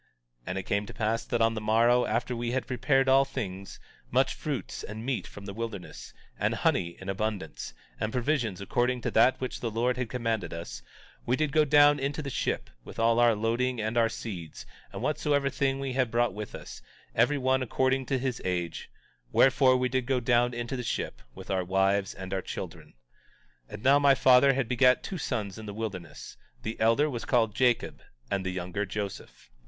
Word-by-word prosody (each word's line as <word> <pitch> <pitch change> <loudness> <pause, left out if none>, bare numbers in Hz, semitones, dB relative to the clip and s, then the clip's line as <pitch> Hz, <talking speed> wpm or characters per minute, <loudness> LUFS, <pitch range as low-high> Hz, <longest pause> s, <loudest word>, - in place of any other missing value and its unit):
18:6 - - -39 0.4
And 90 - -3
it 95 - -2
came 100 +2 -1
to - - -10
pass 115 +1 0
that 120 -1 +1
on 115 0 +3
the 110 - -4
morrow, 115 +3 +3
after 120 +3 -1
we 120 0 -2
had 130 - -1
prepared 135 +2 +1
all 135 +1 +6
things, 100 -8 -6 0.3
much - - +2
fruits - - -4
and 110 +2 -7
meat 130 -2 -2
from 100 - -11
the 100 - -6
wilderness, 110 -4 -6 0.3
and - - +1
honey 85 -2 0
in 95 - -10
abundance, 95 - -4 0.2
and 105 - -1
provisions 125 -6 0
according 125 +5 0
to - - -2
that 120 +4 +4
which 130 - -4
the 115 - -2
Lord 120 +3 0
had 125 -2 -2
commanded 115 -8 -2
us, 70 -8 -7 0.5
we 125 - +3
did 150 0 0
go 155 0 +4
down 145 0 +6
into 140 +3 -2
the 140 - -4
ship, - - -2
with - - -11
all 115 +1 +3
our 120 -2 +5
loading 120 +3 0
and 110 +1 -2
our 115 -1 +3
seeds, 90 -10 -7 0.3
and - - -6
whatsoever 140 -2 +1
thing 135 0 0
we 135 -1 -3
had 130 -2 +1
brought 120 -2 +1
with 105 +1 -6
us, - - -9 0.3
every 125 +6 +3
one 130 0 +1
according 130 +1 0
to 135 - +1
his 130 -2 -2
age; 90 -3 -3 0.4
wherefore, 130 -1 +5
we 125 0 +1
did 130 0 -1
all 135 +1 +1
go - - +1
down 120 0 +2
into 120 +1 -4
the 125 - -3
ship, 115 - -3
with - - -8
our 95 -1 +1
wives 95 +2 +1
and 95 0 -6
our 95 - -1
children. - - -8 0.7
18:7 - - -16
And - - -10
now, 140 +2 +6
my 140 -1 +5
father 130 +1 +6
had 135 -2 -1
begat 125 +1 +4
two 185 - -5
sons 110 -8 -3
in 110 - -8
the 100 - -6
wilderness; 100 -6 -6 0.3
the 110 +1 -5
elder 115 +7 +4
was 120 -6 -4
called 115 -4 +2
Jacob 120 +1 +1 0.3
and 100 -1 0
the 95 - -2
younger 90 +2 -3
Joseph. 95 -12 -6
120 Hz, 205 wpm, -28 LUFS, 105-130 Hz, 0.7 s, all